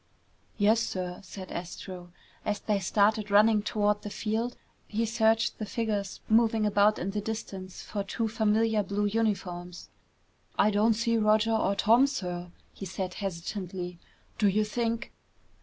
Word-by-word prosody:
"Yes, 215 +2 +4
sir," 180 -5 -3
said 190 -1 -9
Astro. 175 0 -7 0.3
As 210 -1 -1
they 210 -2 0
started 210 +3 +2
running 210 +1 +5
toward 210 0 +1
the 210 - -6
field, 225 +3 -2 0.3
he 225 +2 -1
searched 225 0 +2
the 215 - -2
figures 210 -3 -2
moving 225 -1 +3
about 210 +1 +4
in 190 +3 -3
the 210 +1 -2
distance 195 -3 -6
for 205 -2 -3
two 225 +3 -2
familiar 220 0 +2
blue 200 +1 -1
uniforms. 195 -5 -2 0.7
"I 210 - +4
don't 215 +2 +3
see 230 +1 +1
Roger 215 +1 +3
or 200 -2 +2
Tom, 230 +7 +5
sir," 180 -8 -4 0.2
he 195 - -7
said 185 0 -4
hesitantly. 180 -1 -5 0.4
"Do 210 - +4
you 205 +2 +3
think 230 +1 -2
210 Hz, 145 wpm, -29 LUFS, 195-220 Hz, 0.7 s, running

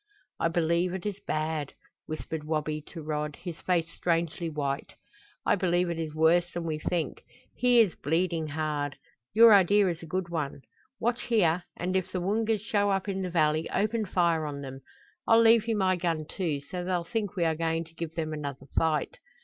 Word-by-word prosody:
"I - - +2
believe 170 +2 +1
it 190 - -6
is 205 -1 -3
bad," 155 -2 -2 0.3
whispered 155 0 -5
Wabi 155 0 -2
to 165 -3 -8
Rod, 150 -1 -2
his 175 -1 -8
face 170 -3 +1
strangely 170 0 -1
white. 140 -2 -3 0.5
"I - - +4
believe 180 -2 +1
it 165 - -4
is 155 -2 -4
worse 170 +2 +3
than 175 - -4
we 155 -2 -2
think. 160 -2 -2 0.3
He 245 -1 +4
is 200 -7 +2
bleeding 165 +1 0
hard. 150 -2 -2 0.4
Your 230 0 +9
idea 200 0 +5
is 170 -2 -4
a 165 - -9
good 180 +2 -2
one. 150 -5 -3 0.4
Watch 240 +2 -1
here, 180 -7 +2
and 185 +2 -2
if 190 -1 0
the 185 - -2
Woongas 215 +3 0
show 205 -1 +1
up 195 0 0
in 195 -1 -2
the 185 - -2
valley 155 -2 +1
open 215 +1 0
fire 170 -4 +1
on 140 -1 -5
them. 135 -1 -8 0.5
I'll 225 0 +6
leave 230 -1 +5
you 225 -2 +1
my 185 -2 +2
gun, 165 -3 -1
too, 160 -7 -2
so 180 +5 -6
they'll 180 -1 -1
think 210 +1 -3
we 175 -3 +1
are 160 - +2
going 165 +1 -1
to 165 0 -18
give 165 -1 -6
them 155 -1 -2
another 140 -3 -5
fight. 160 - +1
170 Hz, 195 wpm, -28 LUFS, 155-190 Hz, 0.5 s, Your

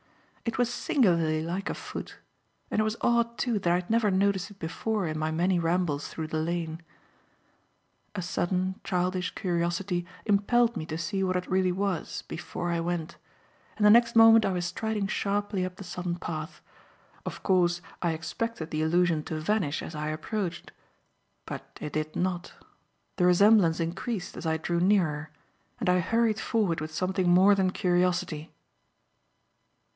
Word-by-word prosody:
It 230 - -2
was 245 -1 +1
singularly 170 - +2
like 180 +4 -3
a - - -2
foot; - - -7 0.5
and 215 - +2
it - - +3
was 215 +1 -1
odd, 235 0 +2
too, 235 -5 0
that 175 -3 +1
I - - +4
had 180 0 -3
never 230 -2 +3
noticed 195 0 +1
it 205 - -15
before 195 +5 -2
in 155 0 -3
my 155 0 0
many 175 +3 +1
rambles 165 -3 0
through 160 -1 -5
the 155 0 -2
lane. 165 0 -2 1.3
A 185 - -2
sudden, 185 +2 -1
childish 180 0 -1
curiosity 175 0 -1 0.2
impelled 230 +3 +3
me 155 - -4
to 155 - -4
see 170 +4 -2
what 185 -1 0
it 180 0 -2
really 185 0 +2
was 190 -2 -2
before 175 +1 -5
I 170 - 0
went, 170 -1 -3 0.6
and 210 - +2
the 210 - +8
next 235 +1 +5
moment 225 0 +8
I 195 - +1
was 180 -1 -1
striding 215 +3 -2
sharply 200 0 -1
up 185 0 -4
the 195 - -9
sodden 180 -1 -4
path. 155 -3 -6 0.6
Of - - -7
course, 175 -2 +3 0.2
I 170 - +1
expected 165 +1 -4
the 155 - -1
illusion 165 0 +2
to 160 -2 -3
vanish 170 -3 0
as - - -7
I 150 0 -3
approached. 175 +4 -4 0.7
But - - -8
it 150 - -6
did 155 0 -2
not. 175 -1 -2 0.6
The 180 -3 +4
resemblance 180 -2 +5
increased 180 +4 -3
as 165 - -5
I 160 0 +1
drew 170 +2 -1
nearer, 170 -6 +2 0.5
and - - -2
I 180 0 +4
hurried 225 +4 +1
forward 200 -9 0
with 155 0 -5
something 185 +2 0
more 185 +3 +6
than 190 -2 +2
curiosity. 175 -4 0
180 Hz, 165 wpm, -28 LUFS, 165-200 Hz, 1.3 s, the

